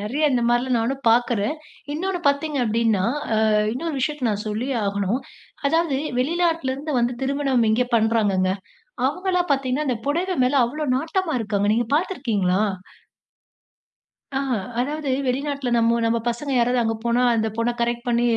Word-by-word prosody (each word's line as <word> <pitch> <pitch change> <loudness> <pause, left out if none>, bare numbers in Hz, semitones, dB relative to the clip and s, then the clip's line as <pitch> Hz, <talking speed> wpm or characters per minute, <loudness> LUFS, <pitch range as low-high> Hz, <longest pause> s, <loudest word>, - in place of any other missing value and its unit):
நெறைய 255 +10 -1
இந்த 245 - +1
மாரில்லாம் 240 +1 +2
நானும் 265 +4 -2
பார்க்கறேன். 235 +1 +2 0.4
இன்னொன்னு 360 +4 -2
பார்த்தீங்க 285 +1 +1
அப்டின்னா, 225 -3 +1 0.3
அ - - +2 0.4
இன்னொரு 315 +4 -3
விஷயத்த 285 0 -1
நான் 210 -1 -1
சொல்லியே 245 +6 -2
ஆகணும். 200 +5 -1 0.5
அதாவது 325 -1 +2 0.2
வெளிநாட்லருந்து 310 -1 0
வந்து 240 +1 +1
திருமணம் 270 -3 +1
இங்கே 245 +3 +2
பண்ணுறாங்கங்க. 210 -5 +2 0.6
அவங்கல்லாம் 360 +2 -1
பார்த்தீங்கன்னா 275 +2 0
அந்த 245 -3 0
புடவை 355 +5 0
மேல 255 - +1
அவ்வளோ 300 +6 -4
நாட்டமா 325 +3 -1
இருக்காங்க. 205 -2 0
நீங்க 235 0 0
பார்த்திருக்கீங்களா? 220 - 0 1.8
ஆ - - 0 0.4
அதாவது 295 +2 -2 0.2
வெளிநாட்ல 275 0 -1
நம்ம 230 0 +3
நம்ம 230 0 +2
பசங்க 245 +4 -3
யாராவது 245 +1 +2
அங்கே 225 0 -1
போனா 235 +1 +2
அந்த 220 -1 +1
பொண்ண 230 +1 +1
கரெக்ட் 235 +1 -1
பண்ணி 240 0 +2
250 Hz, 140 wpm, -23 LUFS, 230-295 Hz, 1.8 s, நம்ம